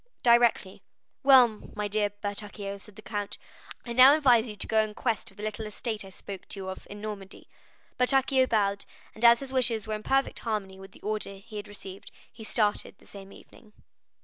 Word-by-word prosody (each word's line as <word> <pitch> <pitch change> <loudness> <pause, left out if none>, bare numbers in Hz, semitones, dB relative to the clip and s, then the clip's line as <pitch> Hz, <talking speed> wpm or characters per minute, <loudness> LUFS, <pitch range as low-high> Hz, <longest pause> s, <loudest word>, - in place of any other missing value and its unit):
"Directly." 235 -5 +3 0.4
"Well, 265 -3 +8 0.3
my 210 0 -2
dear 205 0 0
Bertuccio," 205 0 -5
said 210 0 -14
the 215 - -13
count, 205 -2 -4 0.5
"I 235 - -5
now 260 +4 +8
advise 245 -6 +4
you 210 - -7
to - - -5
go 220 - +2
in 215 -1 -1
quest 230 -4 -2
of 195 - -21
the 210 - -8
little 215 0 -4
estate 215 0 -4
I 195 - -11
spoke 190 0 -9
to 200 - -4
you 190 -1 -5
of 190 - -8
in 205 0 -9
Normandy." 210 -2 -8 0.5
Bertuccio 265 0 +3
bowed, 200 -3 0 0.3
and 220 - -10
as 235 +1 +7
his 270 -1 -6
wishes 235 -4 +2
were 215 - -4
in 215 - -4
perfect 270 +4 0
harmony 200 -4 -4
with 195 0 -13
the - - -17
order 210 -1 -3
he 205 +2 -11
had 205 0 -6
received, 195 -2 -11 0.2
he 225 - -11
started 210 -2 0
the - - -22
same 195 -1 -12
evening. 215 +1 -17
215 Hz, 200 wpm, -28 LUFS, 200-235 Hz, 0.5 s, Well